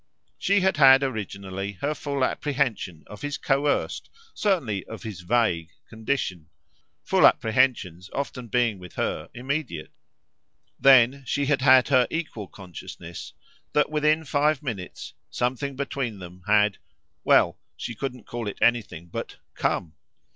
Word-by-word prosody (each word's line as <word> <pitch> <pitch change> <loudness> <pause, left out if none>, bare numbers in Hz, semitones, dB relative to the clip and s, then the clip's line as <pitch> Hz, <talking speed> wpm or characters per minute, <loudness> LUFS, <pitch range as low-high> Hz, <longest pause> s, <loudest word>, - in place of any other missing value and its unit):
She 200 0 +3
had 190 -3 +2
had 135 -1 +8
originally 100 -5 -4
her 140 +10 -2
full 140 -2 -2
apprehension 125 - -2
of 105 - -11
his 145 0 -3
coerced, 140 +1 0 0.2
certainly 145 - 0
of 110 - -9
his 105 -5 -6
vague, 90 -5 +1 0.2
condition 110 - -3 0.5
full - - +6
apprehensions 110 -7 +1
often 125 -3 -4
being 115 -3 +1
with 90 -1 -11
her - - -2
immediate; 130 - -3 0.9
then 135 0 +6
she 140 0 0
had 140 -1 +1
had 130 -1 +6
her 130 -3 +4
equal 150 - -4
consciousness 85 -2 -9 0.4
that 150 0 +2
within 155 +1 +2
five 150 +1 +1
minutes 100 -9 -6 0.2
something 130 +3 -2
between 135 -5 -3
them 90 0 -11
had 105 -1 +3 0.4
well, - - +4 0.2
she 120 - -5
couldn't 125 0 -5
call 120 -2 -5
it 100 - -5
anything 115 -8 +1
but - - -6 0.2
COME. 80 -3 -1
120 Hz, 135 wpm, -25 LUFS, 100-140 Hz, 0.9 s, had